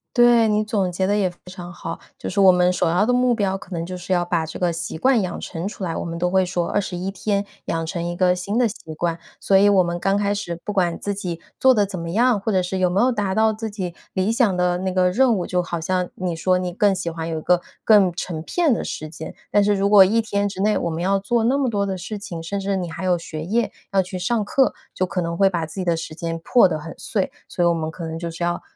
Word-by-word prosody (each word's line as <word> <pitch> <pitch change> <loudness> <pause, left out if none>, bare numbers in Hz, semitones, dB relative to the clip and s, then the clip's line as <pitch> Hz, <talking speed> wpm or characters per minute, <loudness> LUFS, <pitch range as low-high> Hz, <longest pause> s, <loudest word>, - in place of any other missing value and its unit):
对， 240 -2 +6
你 210 0 +2
总 200 -4 -1
结 185 +2 -1
得 200 +2 +1
也 200 -3 +2
非 175 - -16
常 180 -1 -9
好。 165 -1 -6 0.2
就 - - -6
是 200 - -2
我 190 -1 +8
们 180 0 +3
首 175 - +1
要 180 +5 +2
的 250 - +2
目 250 -1 +3
标 195 -3 0
可 190 - -9
能 165 -2 -3
就 185 +1 -6
是 180 +1 -7
要 175 -1 +1
把 170 -2 -1
这 160 - -7
个 175 -2 0
习 165 -1 -5
惯 255 +5 +3
养 185 - -4
成 170 +1 -5
出 205 - -7
来， 165 -3 -2
我 - - -3
们 170 0 -5
都 180 +1 0
会 190 0 +4
说 175 -1 -1
21 190 -2 -2
天 200 0 -1 0.2
养 165 0 -2
成 170 +1 -4
一 175 0 -3
个 180 0 +3
新 195 +4 -3
的 245 -1 +4
习 160 -7 -8
惯， 170 +1 -2 0.2
所 195 - +2
以 200 +1 +6
我 195 -2 +5
们 175 0 -3
刚 195 +2 +1
开 205 0 +1
始 175 -4 -4
不 210 - -3
管 175 -4 +1
自 205 - -2
己 180 -4 -5 0.2
做 265 - +6
得 210 -5 +3
怎 190 -2 -6
么 165 0 -5
样， 235 +2 +3
或 210 +3 -2
者 185 -2 +2
是 185 +1 -3
有 180 -1 +3
没 185 +3 0
有 255 +3 +4
达 205 -5 -1
到 220 0 +3
自 220 +1 -5
己 190 -4 -5 0.2
理 190 +3 +1
想 230 -6 +2
的 180 0 +1
那 190 0 -2
个 180 0 +2
任 250 +3 +3
务， 180 - -2
就 180 -1 0
好 175 -1 -4
像 180 +2 -1
你 180 -2 -3
说 185 +3 +2
你 180 -1 -2
更 200 +1 +3
喜 170 -2 -3
欢 165 0 -5
有 160 - -2
一 - - -4
个 180 +2 +2 0.2
更 205 -4 +5
成 170 -2 -4
片 315 - +1
的 - - -2
时 155 - -5
间， 155 - -9 0.2
但 205 - +4
是 205 0 +3
如 195 0 +1
果 200 -1 +8
1 210 +5 +2
天 205 -2 0
之 190 -1 -5
内 210 +1 +3
我 - - -1
们 165 +1 -3
要 195 +1 +2
做 225 +4 0
那 255 +5 +2
么 265 -3 +1
多 200 -3 0
的 195 -1 -2
事 195 +4 -6
情， 175 -5 -7
甚 200 +5 -3
至 195 0 -1
你 180 -2 -3
还 165 +3 -6
有 180 -2 +2
学 155 -1 -6
业 225 +7 0 0.2
要 195 - +4
去 185 0 -6
上 215 +5 0
课， 265 +6 +2 0.2
就 185 - +1
可 180 0 -2
能 170 0 -3
会 195 - +5
把 170 -4 -1
自 160 - -12
己 190 -2 -3
的 170 -1 +2
时 165 -1 -6
间 165 0 -4
破 245 -6 +5
得 160 -3 -3
很 160 +2 -9
碎。 200 -4 -2 0.2
所 175 - -1
以 - - +4
我 170 - +3
们 160 -1 -3
可 170 - -8
能 160 0 -5
就 170 0 -4
是 165 +1 -5
要， 175 0 -1
185 Hz, 310 characters per minute, -22 LUFS, 175-205 Hz, 0.2 s, 我